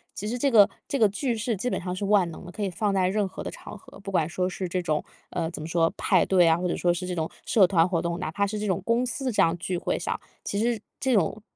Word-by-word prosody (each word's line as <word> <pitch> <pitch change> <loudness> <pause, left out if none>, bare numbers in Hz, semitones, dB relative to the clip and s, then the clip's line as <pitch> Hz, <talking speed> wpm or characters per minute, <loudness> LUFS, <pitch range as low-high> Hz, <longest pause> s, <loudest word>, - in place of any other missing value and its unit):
其 210 - -4
实 240 +3 -2
这 275 +3 +2
个 210 -4 +7 0.2
这 280 - -1
个 220 - +6
句 235 +4 -1
式 225 0 -1
基 245 +6 -2
本 - - -1
上 180 0 -3
是 185 - -5
万 195 -4 +3
能 170 - -10
的， 175 - -9
可 210 - -7
以 195 - 0
放 200 +2 -1
在 185 -1 +2
任 200 +1 +1
何 - - -8
的 - - -4
场 - - -10
合。 195 - -15
不 195 0 -7
管 165 -4 +2
说 180 +2 -1
是 185 0 -4
这 180 +1 -1
种， 155 -3 -1 0.3
呃， 165 -2 -2
怎 155 - -7
么 155 - -5
说， 165 -1 +2
派 185 -4 +3
对 180 -3 +4
啊， 165 0 +4
或 180 +1 -1
者 - - -1
说 175 -1 +2
是 180 +1 -4
这 180 - -2
种 160 -1 -2 0.2
社 205 -4 +5
团 170 -2 +3
活 170 -3 0
动， 170 0 -2
哪 185 - -3
怕 200 +4 +1
是 210 +1 -3
这 210 - -2
种 190 0 0
公 235 +2 +2
司 255 +1 -2
这 - - +2
样 165 +1 +3
聚 180 +1 -3
会 - - -1
上。 - - -3 0.2
其 200 - -2
实 230 -1 0 0.2
这 265 -1 +1
种， 210 +1 +1
190 Hz, 325 characters per minute, -26 LUFS, 175-215 Hz, 0.3 s, 个